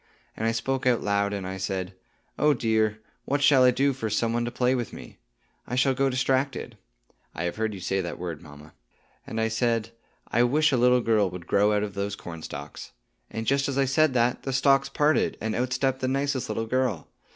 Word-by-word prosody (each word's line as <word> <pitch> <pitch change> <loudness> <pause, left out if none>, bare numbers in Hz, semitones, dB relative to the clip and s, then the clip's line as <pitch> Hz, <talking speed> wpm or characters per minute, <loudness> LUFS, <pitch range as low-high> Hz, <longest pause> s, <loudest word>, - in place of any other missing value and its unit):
And 110 - -1
I - - +2
spoke 130 +3 -1
out 120 -2 +2
loud, 100 0 +1
and 100 -2 -4
I 95 +1 -5
said, 95 -1 -3 0.5
'Oh, 150 -1 +4
dear, 110 -2 +1 0.3
what 145 +1 0
shall 135 -3 +6
I 125 - +7
do 135 +3 +2
for 115 -4 -4
some 115 +2 0
one 120 0 0
to - - -2
play 125 +1 +1
with 120 -4 -2
me? - - -11 0.5
I 125 - -3
shall 130 +1 +3
go 135 +1 +1
distracted' 130 +1 -1 0.6
(I 85 - -3
have 85 +3 -3
heard 110 -1 -1
you - - -8
say 95 +2 -1
that 85 -1 -5
word, 85 -4 -5
mamma)! 75 -1 -14 0.5
And 115 - -4
I 110 - +2
said, 115 0 0 0.4
'I 120 - +2
wish 150 +5 +3
a 130 - +2
little 125 +1 +4
girl 110 -4 +2
would 90 -1 -9
grow 100 +3 +3
out 105 0 +1
of 105 -2 -4
those 100 0 -3
cornstalks;' 80 -5 -8 0.4
and 110 0 -5
just 140 +3 +1
as 135 - -3
I 135 - +3
said 135 +1 +2
that, 120 0 +2
the 135 - -4
stalks 135 0 +3
parted, 150 +1 +1
and 110 0 -2
out 125 +2 -1
stepped 130 0 0
the 130 - -1
nicest 135 -2 -1
little 115 +1 -2
girl. 125 -7 -1
115 Hz, 220 wpm, -26 LUFS, 100-130 Hz, 0.6 s, I